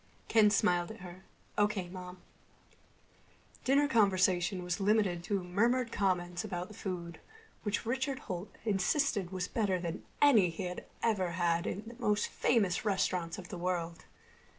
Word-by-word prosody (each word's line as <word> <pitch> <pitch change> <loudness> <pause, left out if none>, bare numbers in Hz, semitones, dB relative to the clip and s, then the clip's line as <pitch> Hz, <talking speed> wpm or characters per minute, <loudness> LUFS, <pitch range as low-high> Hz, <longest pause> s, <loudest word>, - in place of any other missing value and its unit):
Ken 215 -2 +5
smiled 180 -4 +2
at 220 -3 -9
her. 180 +1 -10 0.3
"O.K., 205 -3 +1
Mom." 180 0 -8 1.5
Dinner 280 +2 +4
conversation 185 -5 +2
was 180 +2 -2
limited 195 -4 +2
to 200 -3 -1
murmured 230 +7 +1
comments 180 -2 0
about 180 -3 -4
the - - -10
food, 175 -4 -5 0.4
which 205 0 -2
Richard 265 +3 -1
Holt 185 +1 -4 0.2
insisted 200 - +1
was 185 -1 -2
better 200 -5 0
than 170 0 -4 0.2
any 230 -11 +6
he 165 +3 -5
had 180 0 -5 0.2
ever 190 -6 +1
had 170 -1 +1
in 205 - -3
the 235 - -9
most 210 -3 +1
famous 200 -6 +1
restaurants 185 -4 0
of 180 -2 -9
the 180 - -6
world. 170 -2 -2
190 Hz, 150 wpm, -32 LUFS, 180-215 Hz, 1.5 s, any